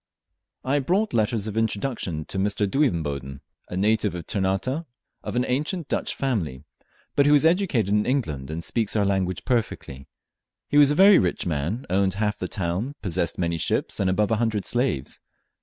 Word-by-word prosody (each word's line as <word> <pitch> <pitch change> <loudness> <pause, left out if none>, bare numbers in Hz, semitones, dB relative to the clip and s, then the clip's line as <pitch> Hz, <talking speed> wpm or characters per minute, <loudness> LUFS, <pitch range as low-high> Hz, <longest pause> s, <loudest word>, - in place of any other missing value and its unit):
I 140 +3 +1
brought 190 +10 0
letters 110 -1 +1
of 110 -1 -4
introduction 110 - -2
to 95 - -5
Mr. 105 +1 +1
Duivenboden, 75 - -1 0.3
a 90 - -4
native 105 -1 +1
of 85 -2 -6
Ternate, 95 +2 -1 0.5
of - - -5
an 125 +1 +1
ancient 150 +5 -2
Dutch - - -1
family, 85 - -2 0.5
but 140 0 +4
who 145 - +5
was 150 +1 +5
educated 165 - +2
in 105 +1 +2
England, 80 - -1
and 80 +2 -4
speaks 110 -3 0
our 105 -2 +2
language 95 -2 -1
perfectly. 105 - -2 0.6
He 145 - +1
was 145 -1 +7
a 145 - +1
very 195 +4 +7
rich 90 -2 -1
man, 85 - -2
owned 95 +1 +1
half 105 0 -1
the 90 - -3
town, 95 +10 -3
possessed 85 -3 -1
many 85 -2 -1
ships, - - -1
and 95 - +2
above 105 +3 +1
a 110 - +2
hundred 110 -3 -1
slaves. 120 - -1
105 Hz, 175 wpm, -24 LUFS, 90-130 Hz, 0.6 s, was